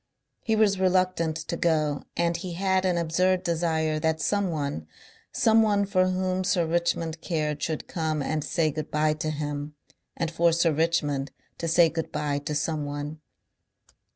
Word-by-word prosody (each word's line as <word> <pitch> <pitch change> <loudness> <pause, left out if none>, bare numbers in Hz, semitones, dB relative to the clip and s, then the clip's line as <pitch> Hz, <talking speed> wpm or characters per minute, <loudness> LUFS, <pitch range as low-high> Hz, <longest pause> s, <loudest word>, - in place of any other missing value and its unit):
He 220 - 0
was 205 -3 +3
reluctant 185 -3 +2
to 160 - -4
go 155 -4 0
and 170 0 +1
he 175 +1 -5
had 190 +1 +1
an 180 -2 +2
absurd 180 +3 +1
desire 160 -3 0
that 160 0 0
someone, 155 - -1 0.4
someone 220 -2 +3
for 185 -2 +2
whom 185 0 0
Sir 180 -2 +1
Richmond 165 -1 -1
cared, 150 -4 -2
should 160 -1 -3
come 160 -2 -2
and 155 +1 -1
say 155 0 0
good 155 +1 -5
bye 150 0 +2
to 155 0 -3
him, 145 -1 -4 0.4
and 165 -1 -1
for 170 0 +3
Sir 165 0 +3
Richmond 150 -3 0 0.3
to 165 - -2
say 165 +1 +5
good 165 0 -4
bye 150 -1 -1
to 145 +1 -4
someone. 145 0 -3
165 Hz, 155 wpm, -26 LUFS, 155-180 Hz, 0.4 s, say